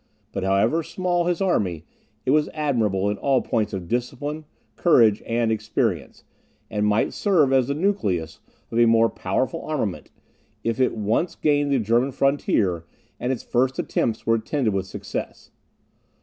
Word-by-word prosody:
But - - -3
however 100 +12 +2
small 175 +1 -1
his 175 0 0
army, 90 - 0 0.4
it 130 - +2
was 150 +1 +3
admirable 110 -10 0
in 105 - -5
all 135 -2 +2
points 110 -3 -1
of 95 -3 -5
discipline, 135 - -3 0.3
courage, 115 - +4
and 115 -1 +1
experience, 110 - -2 0.5
and 105 0 0
might 105 +1 +1
serve 160 -10 +2
as 130 -2 +3
the 140 - -1
nucleus 105 - -1 0.3
of 115 - 0
a 120 - +6
more 115 0 +4
powerful - - -2
armament, - - -3 0.5
if 115 +2 -1
it 130 -3 +1
once 110 - 0
gained 145 -1 +1
the 140 - +3
German 120 +4 +1
frontier, 110 - +1 0.4
and 125 - -1
its 130 - -3
first 130 +2 0
attempts 115 -1 -1
were 115 - +3
attended 115 0 0
with 95 -1 -2
success. - - -6
120 Hz, 155 wpm, -23 LUFS, 105-145 Hz, 0.5 s, a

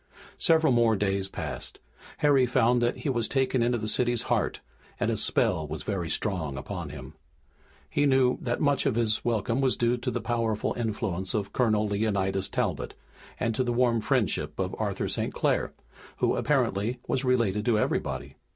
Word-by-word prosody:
Several 160 -5 +4
more 115 -2 +4
days 95 -1 0
passed. - - -5 0.4
Harry 140 -4 +4
found 120 0 +3
that 120 0 +1
he 150 - -3
was 120 -4 0
taken 130 -2 +1
into 120 +1 +2
the 110 -1 -4
city's 120 +1 +1
heart, - - 0 0.4
and - - +1
its - - +1
spell 80 -1 +1
was 75 0 -5
very 95 -5 -2
strong 80 -11 -2
upon 65 - -5
him. - - -9 0.7
He 145 - +1
knew 130 -2 +3
that 120 -1 -1
much 145 -3 +2
of 130 - +1
his 110 -2 +1
welcome 115 +2 0
was 130 -2 +2
due 120 +1 +2
to 120 +2 -3
the 120 0 -2
powerful 115 -2 -1
influence 105 -5 -2
of 100 -2 -2
Colonel 110 -4 +2
Leonidas 100 -2 0
Talbot - - -2 0.4
and 115 - 0
to 130 - 0
the 120 - -1
warm 120 -2 +2
friendship - - 0
of - - -2
Arthur - - -1
St. - - -2
Clair, - - +1 0.5
who - - +2
apparently 110 +6 0
was 135 - 0
related 115 -6 +1
to 115 -3 +3
everybody. - - -2
115 Hz, 175 wpm, -27 LUFS, 105-125 Hz, 0.7 s, Several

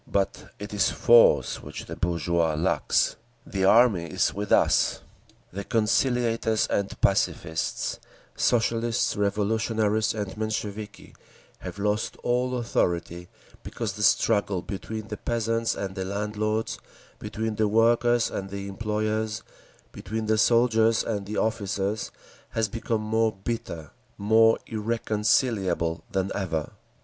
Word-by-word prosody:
But 100 -1 -1
it 105 +1 -8
is 100 -1 +2
force 120 -1 +4
which - - -8
the - - -7
bourgeoisie 85 -2 0
lacks…. 85 - +1 0.3
The 95 -1 -1
Army 110 -5 +5
is 80 - 0
with 100 +1 -5
us. - - +3 0.5
The 100 +2 -4
conciliators 115 0 +1
and 100 -1 -1
pacifists, 80 0 0 0.4
Socialist 115 0 +1
Revolutionaries 110 +1 0
and 105 -3 -4
Mensheviki, 110 -1 -5 0.5
have 90 0 -8
lost 105 +1 -1
all 125 +1 0
authority—because 90 0 -3
the 105 - -7
struggle 100 -2 +2
between 110 +2 -6
the 105 - -5
peasants 115 0 -1
and 95 -1 -4
the 95 -1 -4
landlords, 105 +3 -2 0.4
between 110 -1 -4
the 110 -1 +2
workers 115 +2 +3
and 95 0 -4
the 100 0 -6
employers, 110 +1 -2 0.5
between 110 +3 -5
the 110 0 +1
soldiers 115 -1 +3
and 100 -3 -3
the 105 - -4
officers, 105 -1 -1 0.5
has 110 -1 +2
become 115 +1 -2
more 110 +1 +1
bitter, 85 -9 -4 0.3
more 110 +2 +4
irreconcilable 105 -5 0
than 95 0 -1
ever. 80 -6 -3
110 Hz, 120 wpm, -26 LUFS, 100-115 Hz, 0.5 s, Army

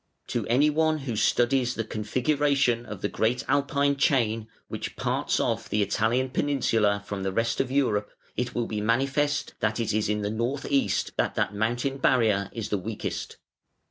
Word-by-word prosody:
To - - -2
anyone 150 +5 +3
who 135 -6 -4
studies 125 +3 +2
the 115 - -1
configuration 125 +2 +1
of 105 -3 -8
the - - +2
great 115 +4 0
Alpine 140 0 +2
chain, 115 -6 +1 0.2
which - - -5
parts - - 0
off - - -1
the 105 0 +2
Italian 115 +6 0
peninsula 115 -8 +1
from 100 -1 -4
the 95 0 -1
rest 115 +5 0
of 135 - -3
Europe, 110 -7 +1 0.3
it 125 0 -3
will 120 - 0
be 105 -2 -3
manifest 135 +6 +1
that 105 +2 0
it 110 -2 0
is 105 -1 0
in 105 0 0
the 100 - -1
north 120 +6 -2
east 140 -1 +1
that - - 0
that - - 0
mountain 120 +6 -1
barrier 110 -7 +2
is 115 -3 -5
the 105 - 0
weakest. 105 +3 -5
120 Hz, 175 wpm, -26 LUFS, 105-135 Hz, 0.3 s, anyone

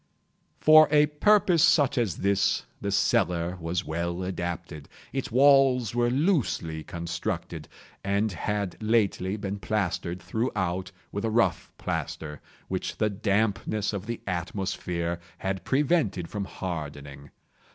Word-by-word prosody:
For 155 0 +8
a 150 0 +5
purpose 175 +2 +3
such 145 -6 +4
as 115 - 0
this 100 -8 +2 0.2
the - - -2
cellar 90 0 +1
was 85 0 -3
well 85 +3 -3
adapted. 85 -4 -5 0.2
Its 135 -3 -3
walls 130 -3 +5
were 120 0 +2
loosely 125 - 0
constructed, 85 0 -4 0.4
and 100 +2 +1
had 100 +2 -3
lately 105 -3 +1
been 100 -1 -4
plastered 90 -4 -2
throughout 95 -2 -2 0.2
with 100 - -4
a 115 - +1
rough 110 -6 +1
plaster, 75 -2 -4 0.3
which - - -3
the 105 -1 +1
dampness 105 +1 0
of 100 +1 -5
the 115 -1 -4
atmosphere 90 -2 -3 0.2
had 95 +1 -3
prevented 135 - +1
from 100 -2 -3
hardening. 75 -6 -6
100 Hz, 120 wpm, -27 LUFS, 85-120 Hz, 0.4 s, For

